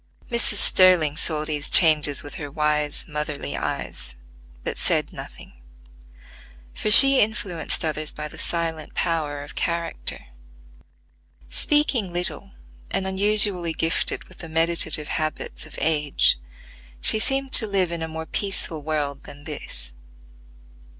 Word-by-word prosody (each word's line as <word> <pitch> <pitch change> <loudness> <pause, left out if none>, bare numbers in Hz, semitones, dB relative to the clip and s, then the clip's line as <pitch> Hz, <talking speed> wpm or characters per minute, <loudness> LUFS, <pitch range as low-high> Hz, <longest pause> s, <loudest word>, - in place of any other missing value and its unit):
Mrs. 235 -2 +2
Sterling 180 -7 +4
saw 155 -2 -1
these 150 -1 -3
changes 150 -4 +4
with 145 - -9
her 145 - -6
wise, 150 0 -1
motherly 150 - -5
eyes, 60 0 -4 0.5
but - - -4
said - - 0
nothing; - - -11 1.2
for - - -3
she 275 +4 +10
influenced 200 -7 0
others 155 -1 -3
by 150 0 -7
the - - -12
silent 165 -2 -4
power 150 -4 -2
of 145 - -12
character. 170 -1 -4 1.3
Speaking 245 - +1
little, 180 +3 -2 0.4
and 195 -1 -2
unusually 190 -3 +3
gifted 165 +2 +1
with - - -18
the 165 - -9
meditative 160 -2 +1
habits 155 -1 -4
of - - -13
age, 150 - +1 0.6
she 220 - +4
seemed 270 +3 0
to 220 - +7
live 190 -4 -1
in 170 -1 -5
a 160 - -3
more 160 0 -7
peaceful 190 -4 -3
world 145 -2 -4
than 145 0 -12
this. 65 - -8
160 Hz, 130 wpm, -22 LUFS, 150-190 Hz, 1.3 s, she